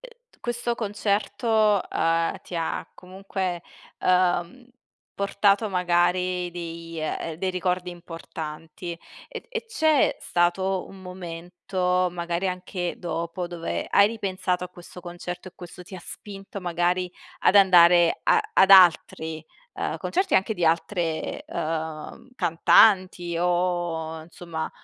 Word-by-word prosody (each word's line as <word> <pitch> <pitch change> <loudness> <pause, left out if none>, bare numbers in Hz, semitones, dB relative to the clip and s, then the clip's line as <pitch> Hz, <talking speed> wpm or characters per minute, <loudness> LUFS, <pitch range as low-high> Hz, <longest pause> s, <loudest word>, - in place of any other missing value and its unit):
e - - -14 0.2
questo 240 0 -2
concerto, 210 0 +1
uhm, 165 0 +1
ti 180 - -10
ha 165 - -3
comunque, 185 -1 -5 0.4
uhm, 180 +5 +1 0.5
portato 200 +2 +2
magari 180 0 +1
dei 165 -1 -7
eh 155 +1 -3
dei 190 +1 -1
ricordi 180 0 -1
importanti. 165 0 -8 0.3
E - - -8
e 465 -1 -5
c'è 315 - +2
stato 185 +2 0
un 195 - -13
momento, 180 +1 -2
magari 175 +1 -2
anche 180 -1 -4
dopo, 170 0 -4
dove 170 -1 -4
hai 200 - +6
ripensato 190 -4 -2
a 180 - -8
questo 180 0 -12
concerto, 175 +1 -7
e - - -17
questo 180 0 -11
ti 185 - -12
ha 185 - -8
spinto 195 +1 -9
magari 180 +1 0 0.3
ad - - +4
andare 175 -3 +6
a 450 - +4
ad 195 - +5
altri, 160 -3 +5 0.3
uhm, - - -3
concerti, 380 +2 0
anche 200 +3 +2
di 175 - -1
altre, 165 0 -1
uhm, 160 +7 -5
cantanti 175 -1 +4
o 175 -2 -1
insomma, 165 -1 -6
180 Hz, 120 wpm, -25 LUFS, 170-195 Hz, 0.5 s, hai